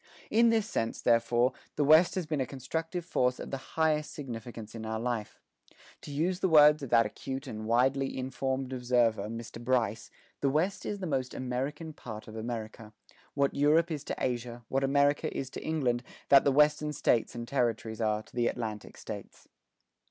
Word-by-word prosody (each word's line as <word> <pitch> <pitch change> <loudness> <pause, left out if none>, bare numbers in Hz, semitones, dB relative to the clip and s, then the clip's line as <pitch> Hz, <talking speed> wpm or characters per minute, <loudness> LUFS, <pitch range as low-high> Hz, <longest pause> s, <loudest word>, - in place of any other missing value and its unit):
In 230 +1 +5
this 220 -2 +2
sense, 115 - -2
therefore, 120 +2 +3 0.2
the 150 - +1
West 155 +5 +6
has 185 -3 -1
been 155 -3 -1
a - - 0
constructive 160 +6 -4
force 125 -7 +1
of - - -7
the 135 -1 -7
highest 155 -1 +2
significance 115 -5 -7
in 115 -1 -7
our 110 0 -3
life. 115 -2 -3 0.6
To - - -9
use 175 +6 0
the 190 - +1
words 150 -1 +7
of 135 - -5
that 115 -1 +5
acute 135 +6 -5
and 110 -4 -6
widely 135 +4 +2
informed 130 0 -2
observer, 120 -4 +1
Mr. 115 +1 -7
Bryce, 120 -3 0 0.3
"The 140 - +2
West 175 +8 0
is 205 -1 -4
the - - -2
most 130 -5 -2
American 135 +5 -3
part 110 -6 -9
of 110 - -9
America.... 110 -1 -6 0.4
What 140 -1 +2
Europe 155 +4 +3
is 150 -3 -3
to - - -3
Asia, 120 -1 -3
what 135 +1 0
America 140 +1 +2
is 135 -1 -4
to - - -7
England, 130 -7 0 0.3
that 140 -1 +7
the 140 - +4
Western 150 +1 +3
States 120 -5 +1
and 120 0 -5
Territories 115 -4 -1
are 110 -1 0
to - - -20
the 120 -1 +2
Atlantic 110 -3 -4
States." - - -9
130 Hz, 180 wpm, -30 LUFS, 115-150 Hz, 0.6 s, words